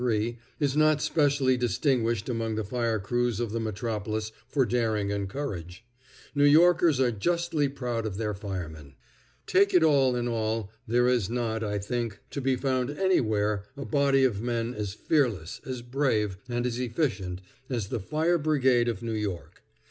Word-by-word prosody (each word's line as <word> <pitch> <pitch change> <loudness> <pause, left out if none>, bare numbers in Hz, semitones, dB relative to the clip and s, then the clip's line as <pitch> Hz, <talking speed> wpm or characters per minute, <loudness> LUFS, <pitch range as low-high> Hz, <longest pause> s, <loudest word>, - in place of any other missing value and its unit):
3 115 -1 0 0.2
is 140 -2 +1
not 155 0 +4
specially 140 -4 +2
distinguished 120 -2 0
among 115 -3 -2
the 110 - -1
fire 115 +1 -1
crews 120 +3 -1
of 120 -3 -2
the 115 - -2
metropolis 110 0 -3 0.2
for 135 -3 +2
daring 110 -3 0
and 100 -1 -2
courage. 95 - -6 0.5
New 145 -1 +2
Yorkers 160 0 +5
are 125 -2 +3
justly 160 +5 0
proud 120 -4 -3
of 95 -3 -5
their 105 -1 -1
firemen. 85 -8 -6 0.5
Take 200 +1 +3
it 175 - +6
all 135 -5 +4
in 120 0 -1
all, 110 -3 -2 0.2
there 120 +2 +3
is 120 -6 +2
not, 115 -2 -1
I 105 -1 -1
think, 115 +1 -3
to 140 - -3
be 130 0 +2
found 130 -1 0
anywhere 110 - +1
a 140 - -5
body 140 -2 +3
of 110 -6 +1
men 120 0 -1
as 105 -3 -4
fearless, 115 - 0
as 125 -2 -4
brave, 120 -7 0
and 120 0 -1
as 125 0 -2
efficient 115 - -2 0.3
as 115 -7 -2
the - - -2
Fire 160 - +1
Brigade 130 -5 +3
of 115 -2 -2
New 115 -1 -2
York. 105 -5 -4
120 Hz, 170 wpm, -27 LUFS, 105-135 Hz, 0.5 s, it